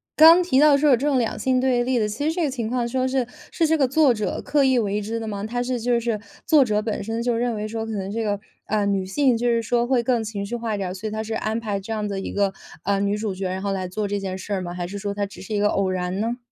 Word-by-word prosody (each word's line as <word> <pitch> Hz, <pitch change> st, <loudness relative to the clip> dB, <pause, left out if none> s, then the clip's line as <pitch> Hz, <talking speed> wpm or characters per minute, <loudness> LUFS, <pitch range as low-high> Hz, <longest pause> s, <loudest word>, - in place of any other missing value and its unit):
刚 330 Hz, +3 st, +8 dB
提 270 Hz, -7 st, +2 dB
到 295 Hz, -1 st, +6 dB
说 295 Hz, +1 st, +3 dB
有 -, -, +7 dB
这 275 Hz, +5 st, -2 dB
种 275 Hz, -3 st, +2 dB
两 230 Hz, -3 st, 0 dB
性 260 Hz, -1 st, +1 dB
对 250 Hz, -2 st, +2 dB
立 255 Hz, 0 st, 0 dB
的 210 Hz, -, +1 dB
其 215 Hz, +7 st, -4 dB
实 -, -, +1 dB
这 345 Hz, +1 st, -1 dB
个 295 Hz, -, +1 dB
情 235 Hz, -4 st, -3 dB
况 245 Hz, -1 st, 0 dB
说 260 Hz, +2 st, 0 dB
是 260 Hz, -2 st, 0 dB, 0.2 s
是 330 Hz, -, +1 dB
这 320 Hz, +1 st, +3 dB
个 270 Hz, -, +3 dB
作 275 Hz, -1 st, +4 dB
者 215 Hz, -2 st, -3 dB
刻 290 Hz, -2 st, +2 dB
意 260 Hz, -2 st, +3 dB
为 210 Hz, -2 st, 0 dB
之 225 Hz, +3 st, -3 dB
的 225 Hz, -, -5 dB
吗？ 200 Hz, -1 st, -4 dB
他 245 Hz, +2 st, -2 dB
是 250 Hz, 0 st, -2 dB
就 240 Hz, 0 st, +2 dB
是 230 Hz, -2 st, -1 dB, 0.3 s
作 300 Hz, -4 st, +6 dB
者 210 Hz, -3 st, 0 dB
本 215 Hz, -2 st, -3 dB
身 225 Hz, +2 st, -3 dB
就 240 Hz, -1 st, +1 dB
认 235 Hz, -1 st, 0 dB
为 210 Hz, 0 st, -3 dB
说 225 Hz, 0 st, -4 dB
可 225 Hz, -, -5 dB
能 195 Hz, -1 st, -3 dB
这 225 Hz, +2 st, -2 dB
个， 205 Hz, -2 st, -1 dB, 0.3 s
呃， 210 Hz, -1 st, +1 dB
女 195 Hz, -2 st, 0 dB
性 255 Hz, +5 st, +2 dB
就 240 Hz, +1 st, -1 dB
是 235 Hz, -1 st, +2 dB
说 235 Hz, +2 st, 0 dB
会 250 Hz, -2 st, +2 dB
更 235 Hz, -2 st, +1 dB
情 210 Hz, -2 st, -4 dB
绪 240 Hz, +4 st, -4 dB
化 230 Hz, -2 st, -2 dB
一 -, -, -3 dB
点 190 Hz, -2 st, -3 dB
儿， -, -, -4 dB
所 200 Hz, +3 st, -5 dB
以 -, -, -4 dB
他 220 Hz, 0 st, -3 dB
是 220 Hz, 0 st, -5 dB
安 220 Hz, 0 st, -1 dB
排 210 Hz, -3 st, -2 dB
这 200 Hz, +3 st, -8 dB
样 215 Hz, -1 st, -1 dB
的 200 Hz, -1 st, -3 dB
一 -, -, -5 dB
个， 200 Hz, -1 st, +1 dB, 0.3 s
呃， 200 Hz, 0 st, +1 dB
女 200 Hz, +1 st, 0 dB
主 210 Hz, -2 st, -2 dB
角 190 Hz, 0 st, -3 dB
儿 -, -, -3 dB
然 190 Hz, -, -4 dB
后 200 Hz, -, -1 dB
来 190 Hz, -1 st, -2 dB
做 205 Hz, +3 st, -3 dB
这 205 Hz, 0 st, -2 dB
件 190 Hz, -1 st, -4 dB
事 195 Hz, +2 st, -5 dB
儿 190 Hz, -, -1 dB
吗？ 175 Hz, -1 st, -5 dB
还 175 Hz, -1 st, -4 dB
是 200 Hz, +2 st, -6 dB
说 200 Hz, 0 st, -3 dB
它 205 Hz, 0 st, -1 dB
只 200 Hz, -, -11 dB
是 195 Hz, -, -6 dB
一 -, -, +1 dB
个 205 Hz, 0 st, +3 dB
偶 195 Hz, -1 st, +1 dB
然 185 Hz, +1 st, -2 dB
呢？ 230 Hz, +3 st, -1 dB
220 Hz, 350 characters per minute, -23 LUFS, 200-245 Hz, 0.3 s, 刚